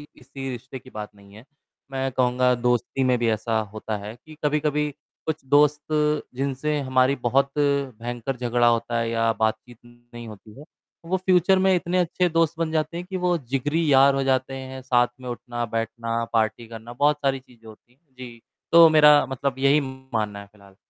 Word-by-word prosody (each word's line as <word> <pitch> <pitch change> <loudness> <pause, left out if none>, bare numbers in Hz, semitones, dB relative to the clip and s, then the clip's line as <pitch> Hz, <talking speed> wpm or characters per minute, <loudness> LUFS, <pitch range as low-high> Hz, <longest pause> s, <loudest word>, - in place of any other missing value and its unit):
किसी 135 0 -8
रिश्ते 125 +2 -8
की 130 - -16
बात 105 -2 -8
नहीं 100 0 -18
है। 115 +4 -14 0.5
मैं 135 0 -2
कहूँगा 125 0 +2
दोस्ती 125 +2 +1
में 125 -1 +2
भी 115 -1 +1
ऐसा 110 +1 0
होता 110 0 -4
है 105 +3 -8
कि 155 -1 -13
कभी-कभी 150 0 0 0.4
कुछ 155 -4 -4
दोस्त 150 0 +4 0.5
जिनसे 140 +3 -2
हमारी 130 +1 +2
बहुत 135 +2 +2
भयंकर 130 -3 -2
झगड़ा 120 0 +1
होता 115 0 +1
है 115 0 -1
या 115 0 +1
बातचीत 110 +2 -2
नहीं 120 -1 -13
होती 110 +3 -13
है। - - -10 0.4
वो 190 +3 0
फ्यूचर 185 0 +3
में 190 0 +3
इतने 175 +1 -1
अच्छे 180 +1 +1
दोस्त 165 0 +1
बन 160 -1 -1
जाते 155 +1 -1
हैं 175 - -6
कि 190 - -3
वो 180 -1 +1
जिगरी 140 +4 -2
यार 135 +1 +6
हो 135 - 0
जाते 130 0 0
हैं, 130 0 -7
साथ 125 -1 +2
में 125 - -7
उठना-बैठना, 115 -1 -3
पार्टी 115 +1 0
करना, 115 +1 -10
बहुत 145 +3 +2
सारी 135 -1 +1
चीज़ें 120 -3 -20
होती 110 +3 -16
हैं। 140 -1 -39
जी। 120 -2 -10 0.3
तो 170 -1 +9
मेरा 150 -2 +6
मतलब 135 0 -3
यही 140 +2 +4 0.3
मानना 105 -2 -2
है 100 - -11
फिलहाल। 100 -2 -20
130 Hz, 185 wpm, -24 LUFS, 115-145 Hz, 0.5 s, तो